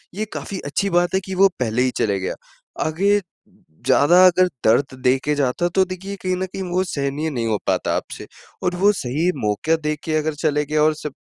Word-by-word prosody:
ये 215 +2 -2
काफ़ी 195 - -5
अच्छी 170 +8 -1
बात 175 0 +1
है - - +3
कि 190 -1 -5
वो 195 +1 +6
पहले 120 -1 0
ही 130 0 +2
चले 100 -2 0
गया, 95 - -3 0.5
आगे 195 +6 +2 0.7
ज़्यादा 175 +6 +6
अगर 185 0 +5 0.2
दर्द 130 +5 +3
दे 125 +1 +4
के 150 - +1
जाता 140 +5 0
तो 190 - +5
देखिए 185 +2 -6
कहीं 185 -1 0
न 190 - -2
कहीं 190 +1 -7
वो 185 +1 +1
सहनीय 145 -2 -2
नहीं 120 -5 -2
हो 110 -2 +1
पाता - - 0
आपसे। - - -7 0.4
और 180 0 0
वो 200 +3 +4
सही 155 +3 -1
मौका 105 +10 +1
देके 150 +1 -2
अगर 155 0 -1
चले 150 -1 +1
गया 150 +1 0
और 155 +1 +4
स 150 - -2
155 Hz, 210 wpm, -21 LUFS, 140-185 Hz, 0.7 s, वो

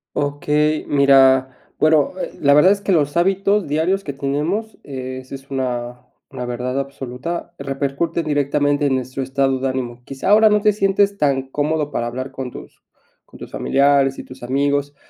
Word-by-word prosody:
Okey, 150 +1 0
mira 135 -2 +4 0.2
bueno, 155 -2 +3 0.3
la 140 -1 +5
verdad 175 +6 +6
es 200 0 0
que 200 - -1
los 145 -5 +1
hábitos 195 +3 +2
diarios 165 +7 0
que 145 - -4
tenemos, 150 +11 -2
eh, 130 -2 -6
esa 130 +1 -9
es 135 0 -13
una 125 -2 -3 0.3
una 125 - -5
verdad 125 +2 -3
absoluta, 140 +5 -5
repercute 140 +4 -2
directamente 145 -1 0
en 135 -2 +2
nuestro 130 +1 -3
estado 135 0 0
de 135 - -1
ánimo. 125 -2 -4
Quizá 135 +5 -4
ahora 215 +1 +6
no 210 0 +2
te 210 0 +3
sientes 200 0 +1
tan 135 -5 0
cómodo 150 +1 -1
para 120 - -2
hablar 130 +3 -5
con 130 -1 -6
tus - - -12 0.4
con - - -16
tus - - -10
familiares 140 -1 +2
y - - -7
tus 130 - -13
amigos, 140 +3 -1
140 Hz, 170 wpm, -20 LUFS, 130-155 Hz, 0.4 s, verdad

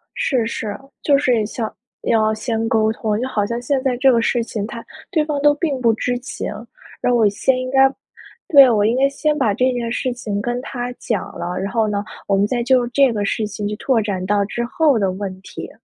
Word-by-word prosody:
是 250 -5 0
是， 215 -2 -4 0.3
就 285 - +4
是 245 -6 +2
想 220 0 -4 0.3
要 220 -1 +2
先 225 0 -2
沟 220 -1 +2
通， 215 -2 -2
就 255 - -1
好 210 -5 0
像 235 +2 -3
现 265 +2 0
在 260 -2 0
这 265 +2 +4
个 235 - +3
事 235 +1 +1
情， 215 -3 -4
他 230 +1 -8 0.3
对 315 -5 +2
方 295 -2 -2
都 295 0 +5
并 290 -4 -2
不 235 -2 +4
知 245 +2 -1
情， 250 - -6 0.5
然 245 - +1
后 240 - +3
我 220 -2 +5
先 240 +6 +1
应 255 0 -4
该 270 0 +6 0.6
对， 275 -4 +8
我 215 -4 +3
应 225 +3 +2
该 275 +1 +4
先 300 +2 -1
把 210 -7 +1
这 255 +4 +2
件 240 -2 -3
事 250 +1 -1
情 210 -4 -4
跟 240 +2 -2
他 245 -2 -5
讲 220 -4 -2
了， 180 +1 -4
然 195 +1 -3
后 225 -2 +1
呢， 205 -1 -2 0.2
我 195 - +2
们 200 - +3
再 240 +2 -1
就 250 -1 +3
这 265 0 +3
个 205 -2 -1
事 215 +1 -1
情 205 0 -5
去 210 - -4
拓 250 +1 +1
展 195 -3 -3
到 205 +1 +2
之 235 +4 -3
后 280 0 +2
的 195 -2 +1
问 190 -1 -6
题。 - - -8
235 Hz, 250 characters per minute, -20 LUFS, 210-255 Hz, 0.6 s, 对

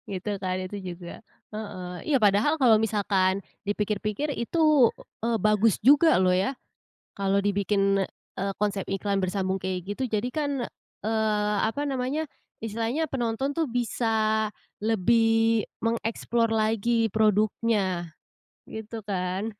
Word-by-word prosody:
gitu 190 +2 -4
kan 185 0 -1
itu 185 +2 -5 0.2
juga. 175 +4 -10 0.3
Heeh, 185 -4 -6
iya - - +5
padahal 215 +10 +3
kalau 235 -4 +6
misalkan 200 -3 +1 0.2
dipikir-pikir 210 +5 -1
itu, 300 -1 +3 0.3
eee, 230 0 +2
bagus 215 -1 +3
juga 290 - +6
loh 185 -1 +3
ya. 195 +8 +1 0.6
Kalau 195 0 +1
dibikin, 200 0 +1 0.3
eee, 195 +1 -2
konsep 200 -2 0
iklan 195 0 -1
bersambung 190 0 -1
kayak 185 +1 -3
gitu. 265 - -3
Jadi 215 +2 0
kan, 285 -2 -2 0.4
eee, 215 -1 +1 0.2
apa 290 +4 -3
namanya 275 +4 -2 0.3
istilahnya 230 +8 -2
penonton 265 +1 -2
tuh 330 - +1
bisa 220 -3 0 0.3
lebih 225 +1 +3 0.2
mengeksplor 230 0 0
lagi 225 +1 +2
produknya 210 -4 +1 0.6
gitu 220 +1 -7
kan. 190 +2 -2
215 Hz, 120 wpm, -26 LUFS, 195-230 Hz, 0.6 s, kalau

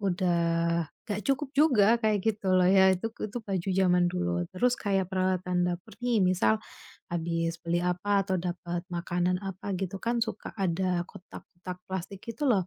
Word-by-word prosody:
udah 170 -3 +1 0.2
enggak 205 0 -2
cukup 275 +1 +1
juga, 255 -10 +5
kayak 215 -1 +3
gitu 205 -4 0
loh 180 -1 +5
ya. 190 0 +6
Itu 225 +5 -3
itu 215 +3 -3
baju 195 -3 -3
zaman 180 -1 +3
dulu. 85 0 -1
Terus 245 +6 +2
kayak 195 -3 0
peralatan 185 -1 +1
dapur 175 +1 -4
nih. 235 -4 +2
Misal 175 -13 +3 0.5
habis 165 0 -1
beli 170 +1 0
apa 180 +3 +1
atau 190 -2 +1
dapat 175 -1 -3
makanan 175 +1 0
apa, 195 +1 -5
gitu 195 0 -3
kan, 235 0 0
suka 220 -2 -3
ada 185 -1 +1
kotak-kotak 180 0 -10
plastik, 190 +1 -5
gitu 235 +6 -4
loh. 195 -7 +3
185 Hz, 160 wpm, -28 LUFS, 175-200 Hz, 0.5 s, ya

